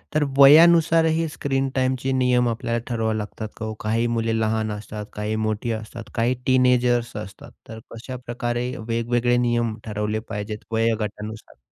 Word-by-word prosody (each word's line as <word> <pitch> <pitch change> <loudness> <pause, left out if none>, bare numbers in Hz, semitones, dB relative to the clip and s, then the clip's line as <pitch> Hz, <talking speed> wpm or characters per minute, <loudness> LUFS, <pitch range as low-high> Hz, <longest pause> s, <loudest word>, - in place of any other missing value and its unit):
तर 155 - +3
वयानुसार 165 +3 +7
ही 160 0 +1
स्क्रीन 135 -3 -1
टाईमचे 130 0 0
नियम 125 -2 +2
आपल्याला 115 +1 -2
ठरवावे 110 -2 -1
लागतात 105 0 -5
का 110 - -5
ओ? 110 - -4
काही 115 +2 0
मुले 115 0 0
लहान 110 -1 0
असतात, 105 0 -6
काही 105 +1 -3
मोठी 110 +2 -2
असतात, 110 +1 -7
काही 120 +3 +1
टीनेजर्स 125 -2 +2
असतात, 100 -2 -9 0.2
तर 110 0 -8
कशाप्रकारे 120 0 -4 0.2
वेगवेगळे 120 +1 +1
नियम 120 -2 0
ठरवले 105 0 -2
पाहिजेत 105 0 -5
वयोगटानुसार? 110 -1 -2
115 Hz, 145 wpm, -23 LUFS, 110-125 Hz, 0.2 s, वयानुसार